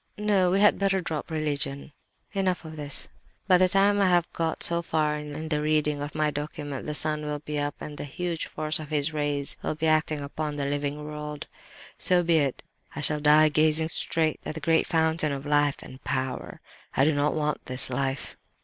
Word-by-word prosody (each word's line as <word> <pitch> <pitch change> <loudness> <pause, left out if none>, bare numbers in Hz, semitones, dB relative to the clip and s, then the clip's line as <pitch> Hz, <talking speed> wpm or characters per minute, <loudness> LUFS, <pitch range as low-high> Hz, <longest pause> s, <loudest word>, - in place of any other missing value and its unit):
No, 205 -3 +2
we 190 +2 +2
had 210 - +5
better 195 -1 +2
drop 160 -3 -4
religion. 145 -2 -2 0.4
"And 195 -2 0
enough 180 -2 -1
of 160 0 -8
this. 145 -2 -1 0.4
By 180 -2 +6
the 185 0 +5
time 200 +2 +3
I 195 - +4
have 175 -1 +4
got 165 -1 -1
so 170 0 +3
far 155 -2 0
in 150 +1 -6
the 150 -1 +1
reading 150 -1 +1
of 145 +1 -5
my 155 -1 +1
document 145 -2 -5
the 150 - -2
sun 150 +1 +1
will 150 0 -3
be 150 0 -4
up 145 0 -2
and 150 -1 -8
the - - -3
huge 170 +3 -3
force 155 0 0
of 155 -2 -8
his 150 0 +1
rays 145 -2 -1
will - - -2
be 155 +1 -2
acting 155 -1 +2
upon 150 +1 -4
the 145 -1 -2
living 145 +1 -2
world. 150 -1 -6 0.5
So 180 -1 +3
be 170 -1 +3
it. 140 -3 -1 0.3
I 150 - -4
shall 150 0 +1
die 150 +1 +6
gazing 155 +1 +3
straight 160 -1 0
at - - -5
the - - -4
great 160 +1 +2
Fountain 160 -1 +2
of 140 0 -4
life 145 -1 +2
and 130 +1 -12
power; 130 -1 -3 0.4
I 135 - +5
do 155 - +3
not 145 +1 +1
want 150 -1 -1
this 130 +1 0
life! 135 0 -2
150 Hz, 210 wpm, -27 LUFS, 145-160 Hz, 0.5 s, By